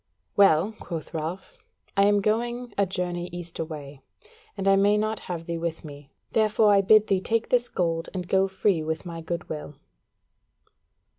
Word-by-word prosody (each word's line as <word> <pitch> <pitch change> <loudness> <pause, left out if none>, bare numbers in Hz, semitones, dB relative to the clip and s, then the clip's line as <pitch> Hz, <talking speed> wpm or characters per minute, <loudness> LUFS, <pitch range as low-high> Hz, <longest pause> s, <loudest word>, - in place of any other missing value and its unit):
"Well," 195 0 +5
quoth 165 -2 -6
Ralph, 165 +4 -5 0.4
"I 200 0 +5
am 205 0 +4
going 235 +3 -1
a 200 -1 +2
journey 180 -1 -3
east 175 -1 -8
away, 145 -4 -6 0.6
and 195 - -2
I 195 - +6
may 200 +2 +4
not 215 0 -1
have 170 -2 -4
thee 170 0 -3
with 165 -1 -4
me, 145 -2 -11 0.2
therefore 215 -1 +4
I 200 - +5
bid 215 +2 +6
thee 195 -3 +1
take 230 +3 -1
this 245 -1 +2
gold 165 -2 -1
and 180 -2 -5
go 190 +1 +3
free 190 -2 +1
with 160 +2 -3
my 165 -1 -6
goodwill." 160 -3 -5
180 Hz, 165 wpm, -26 LUFS, 165-205 Hz, 0.6 s, I